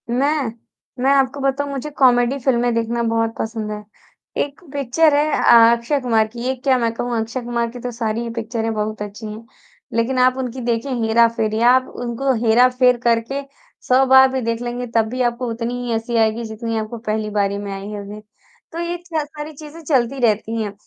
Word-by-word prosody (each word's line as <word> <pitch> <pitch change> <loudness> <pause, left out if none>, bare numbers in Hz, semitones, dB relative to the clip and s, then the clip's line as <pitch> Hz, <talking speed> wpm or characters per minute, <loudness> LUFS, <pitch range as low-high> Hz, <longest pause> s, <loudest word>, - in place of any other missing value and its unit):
मैं 275 +1 +1 0.5
मैं 270 - +4
आपको 270 0 +1
बताऊँ 275 +1 -1
मुझे 275 +2 -4
कॉमेडी 245 0 +4
फ़िल्में 245 -2 +1
देखना 230 +1 -1
बहुत 225 0 0
पसंद 220 -1 -3
है। 210 0 -6 0.6
1 285 0 -9
पिक्चर 285 +3 +2
है 295 +1 +2
अ 230 0 +7
अक्षय 235 +5 -1
कुमार 225 -3 +2
की, 235 +2 -11
ये 260 +2 -1
क्या 260 +1 +1
मैं 230 -2 0
कहूँ 240 0 -2
अक्षय 225 +3 -3
कुमार 235 -1 -2
की 245 - -9
तो 245 +1 -5
सारी 230 -1 -2
ही 235 - -4
पिक्चरें 225 0 -3
बहुत 215 0 -3
अच्छी 210 +2 -7
हैं, 215 +2 -8 0.5
लेकिन 230 +3 0
आप 255 +1 +4
उनकी 255 -1 -4
देखें 235 +2 -1
हेरा-फेरी 225 -1 +2
आप 260 0 +3
उनको 245 +3 -1
हेरा-फेर 250 +2 +4
करके 235 +4 +1 0.5
100 260 +1 +4
बार 265 0 +7
भी 260 0 -1
देख 230 0 -2
लेंगे 245 0 -4
तब 225 -1 +4
भी 255 +2 -3
आपको 240 0 -1
उतनी 230 +1 -3
ही 240 - -3
हँसी 225 +1 -2
आएगी 225 +1 +2
जितनी 225 +1 -4
आपको 220 +2 -4
पहली 215 -1 -3
बारी 200 -1 0
में 200 0 -5
आई 195 +1 -7
होगी। 205 0 -7 0.5
तो 335 - -6
ये 345 +1 -2
च 320 -3 -2
सारी 300 +1 -8
चीज़ें 305 +2 -11
चलती 270 -3 +1
रहती 220 +1 0
हैं। 205 -2 -4
235 Hz, 195 wpm, -20 LUFS, 225-260 Hz, 0.6 s, अ